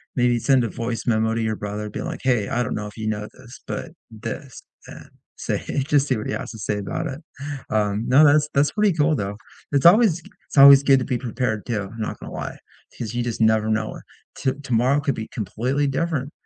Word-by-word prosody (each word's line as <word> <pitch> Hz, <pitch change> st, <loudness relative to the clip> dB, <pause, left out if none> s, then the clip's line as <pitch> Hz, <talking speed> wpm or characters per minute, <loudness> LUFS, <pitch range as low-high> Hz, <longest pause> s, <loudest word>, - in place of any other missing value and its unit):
maybe 120 Hz, -1 st, +2 dB
send 130 Hz, +1 st, +3 dB
a 115 Hz, -, -1 dB
voice 115 Hz, -1 st, -4 dB
memo 110 Hz, -1 st, +2 dB
to 115 Hz, -, -1 dB
your 110 Hz, -1 st, -1 dB
brother 105 Hz, +1 st, -5 dB
being -, -, -5 dB
like, -, -, -5 dB
"Hey, 120 Hz, -6 st, +1 dB
I 125 Hz, -2 st, 0 dB
don't -, -, -3 dB
know 105 Hz, 0 st, -4 dB
if 105 Hz, -, -12 dB
you 110 Hz, -1 st, -4 dB
know 105 Hz, -1 st, -3 dB
this, 120 Hz, +1 st, -14 dB
but 170 Hz, -, -5 dB, 0.2 s
this," 115 Hz, +4 st, -7 dB, 0.2 s
and -, -, -12 dB, 0.3 s
say -, -, -3 dB
h 135 Hz, -1 st, -1 dB
just 145 Hz, -2 st, +3 dB
see 130 Hz, -, +1 dB
what 105 Hz, -, -5 dB
he -, -, -2 dB
has -, -, -5 dB
to 110 Hz, -, -10 dB
say 105 Hz, +1 st, -2 dB
about 130 Hz, +11 st, -3 dB
it, 135 Hz, -1 st, -6 dB, 0.5 s
um, 105 Hz, 0 st, 0 dB
no, 135 Hz, +4 st, +6 dB
that's 150 Hz, 0 st, +4 dB
that's 140 Hz, +1 st, +3 dB
pretty 210 Hz, -3 st, +2 dB
cool, 155 Hz, -1 st, +2 dB
though. 100 Hz, 0 st, -3 dB, 0.4 s
It's 140 Hz, +2 st, +2 dB
always 180 Hz, -3 st, +5 dB
g -, -, -16 dB, 0.2 s
it's -, -, -6 dB
always 140 Hz, 0 st, +9 dB
good 135 Hz, -1 st, +5 dB
to 125 Hz, -, -3 dB
be 125 Hz, -3 st, -1 dB
prepared 115 Hz, -3 st, -3 dB
too, 105 Hz, -5 st, -3 dB
I'm 115 Hz, -, -10 dB
not 110 Hz, -, -4 dB
gonna -, -, -9 dB
lie -, -, -5 dB, 0.4 s
'cause 115 Hz, -2 st, -4 dB
you 120 Hz, -, 0 dB
just 120 Hz, -2 st, -4 dB
never 110 Hz, -1 st, +3 dB
know. 110 Hz, 0 st, -1 dB, 0.4 s
T 130 Hz, -, 0 dB
tomorrow 130 Hz, +2 st, +2 dB
could 140 Hz, -3 st, -1 dB
be 110 Hz, -, -5 dB
completely 125 Hz, +7 st, -1 dB
different 140 Hz, 0 st, -2 dB
120 Hz, 235 wpm, -23 LUFS, 110-140 Hz, 0.5 s, always